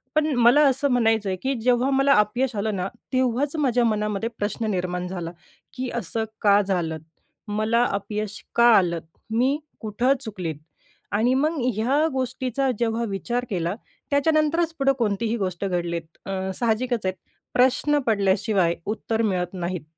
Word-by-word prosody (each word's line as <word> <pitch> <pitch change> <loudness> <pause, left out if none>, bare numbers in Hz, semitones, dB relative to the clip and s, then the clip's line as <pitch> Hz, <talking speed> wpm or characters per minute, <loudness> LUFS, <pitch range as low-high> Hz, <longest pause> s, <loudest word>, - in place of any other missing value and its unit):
पण 305 0 +3
मला 245 +5 +6
असं 270 +2 +1
म्हणायचं 225 -4 +2
आहे, 190 - 0
की 270 +1 +1
जेव्हा 250 +2 +2
मला 275 +1 +4
अपयश 240 +4 0
आलं 210 +1 -1
ना, 185 0 -2 0.3
तेव्हाच 260 +3 +1
माझ्या 250 -4 +2
मनामध्ये 210 0 0
प्रश्न 215 +2 -2
निर्माण 180 -1 -2
झाला, 175 -2 -5 0.4
की 255 -1 -4
असं 225 0 -2 0.2
का 205 -1 +5
झालं? 175 -5 -1 0.5
मला 215 +3 +1
अपयश 205 +1 -4
का 235 - +5
आलं? 170 -3 +1 0.3
मी 255 +5 +2 0.2
कुठं 235 +4 +1
चुकले? 190 -9 -4 0.6
आणि 225 +5 +2
मग 305 +3 +1 0.2
ह्या 270 +9 +2
गोष्टीचा 260 0 -1
जेव्हा 230 0 0
विचार 240 +5 -2
केला, 175 -1 -1 0.4
त्याच्यानंतरच 310 +3 +2
पुढं 275 0 +3
कोणतीही 225 +1 0
गोष्ट 185 -2 -2
घडलीत. 170 -2 -2 0.2
अ, 195 - -5 0.3
साहजिकच 235 -1 0
आहे 185 - +1 0.4
प्रश्न 265 +4 +3
पडल्याशिवाय 195 -4 +2
उत्तर 220 +1 -2
मिळत 185 -5 -1
नाही. 180 -2 -3
225 Hz, 145 wpm, -24 LUFS, 195-255 Hz, 0.6 s, मला